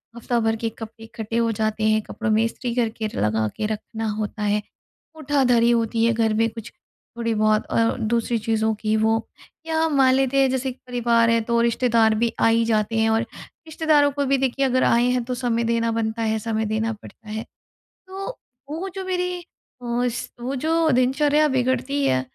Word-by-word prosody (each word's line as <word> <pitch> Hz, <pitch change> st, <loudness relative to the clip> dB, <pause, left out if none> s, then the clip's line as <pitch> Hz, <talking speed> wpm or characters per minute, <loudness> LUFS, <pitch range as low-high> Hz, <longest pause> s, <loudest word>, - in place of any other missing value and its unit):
हफ़्ता 235 Hz, 0 st, -1 dB
भर 225 Hz, 0 st, +1 dB
के 225 Hz, -, +1 dB
कपड़े 225 Hz, 0 st, -10 dB
इकट्ठे 225 Hz, 0 st, -5 dB
हो 230 Hz, -1 st, +2 dB
जाते 215 Hz, 0 st, -2 dB
हैं 215 Hz, 0 st, +2 dB
कपड़ों 220 Hz, +1 st, -5 dB
में 220 Hz, +1 st, +3 dB
इस्त्री 235 Hz, +1 st, -3 dB
करके 225 Hz, -2 st, -1 dB
लगा 110 Hz, +1 st, +1 dB
के 215 Hz, -, -2 dB
रखना 220 Hz, +1 st, -4 dB
होता 210 Hz, 0 st, -4 dB
है। 210 Hz, 0 st, +1 dB, 0.6 s
उठाधरी 260 Hz, -5 st, +2 dB
होती 230 Hz, -1 st, +1 dB
है 235 Hz, -, +3 dB
घर 225 Hz, -1 st, +1 dB
में 225 Hz, +1 st, +2 dB
कुछ 225 Hz, 0 st, -9 dB, 0.5 s
थोड़ी 230 Hz, -1 st, -1 dB
बहुत 215 Hz, 0 st, +2 dB
और 230 Hz, +2 st, +2 dB
दूसरी 230 Hz, +1 st, 0 dB
चीज़ों 220 Hz, 0 st, 0 dB
की 215 Hz, +1 st, -1 dB
वो। 220 Hz, +1 st, +2 dB, 0.5 s
या 320 Hz, 0 st, +1 dB
मान 270 Hz, -3 st, +4 dB
लेते 270 Hz, 0 st, +1 dB
हैं 265 Hz, -, +3 dB
जैसे 260 Hz, 0 st, -1 dB, 0.2 s
परिवार 235 Hz, -1 st, +2 dB
है 230 Hz, -, +3 dB
तो 235 Hz, -, +3 dB
रिश्तेदार 230 Hz, -2 st, +3 dB
भी 230 Hz, +1 st, +1 dB
आ -, -, +4 dB
ही 230 Hz, 0 st, +3 dB
जाते 225 Hz, 0 st, 0 dB
हैं 220 Hz, -, +3 dB
और 225 Hz, 0 st, +2 dB, 0.5 s
रिश्तेदारों 305 Hz, -2 st, +3 dB
को 285 Hz, 0 st, -1 dB
भी 275 Hz, 0 st, +2 dB
देखिए 270 Hz, +1 st, 0 dB
अगर 255 Hz, -1 st, +2 dB
आए 235 Hz, +1 st, +3 dB
हैं 250 Hz, -1 st, 0 dB
तो 250 Hz, -, -4 dB
समय 240 Hz, -2 st, 0 dB
देना 230 Hz, 0 st, 0 dB
बनता 220 Hz, +1 st, -3 dB
है, 220 Hz, -1 st, 0 dB
समय 220 Hz, 0 st, -2 dB
देना 220 Hz, +1 st, -1 dB
पड़ता 215 Hz, +1 st, -14 dB
है। 220 Hz, +1 st, -4 dB, 0.6 s
तो 390 Hz, +6 st, -6 dB, 0.3 s
वो 335 Hz, +6 st, -4 dB
जो 385 Hz, -, -4 dB
मेरी 360 Hz, -1 st, -2 dB, 0.4 s
अस 240 Hz, 0 st, -2 dB
वो 255 Hz, +3 st, -3 dB
जो 320 Hz, +4 st, +1 dB
दिनचर्या 290 Hz, +4 st, +3 dB
बिगड़ती 265 Hz, +2 st, 0 dB
है 130 Hz, -, +2 dB
230 Hz, 190 wpm, -23 LUFS, 220-260 Hz, 0.6 s, मान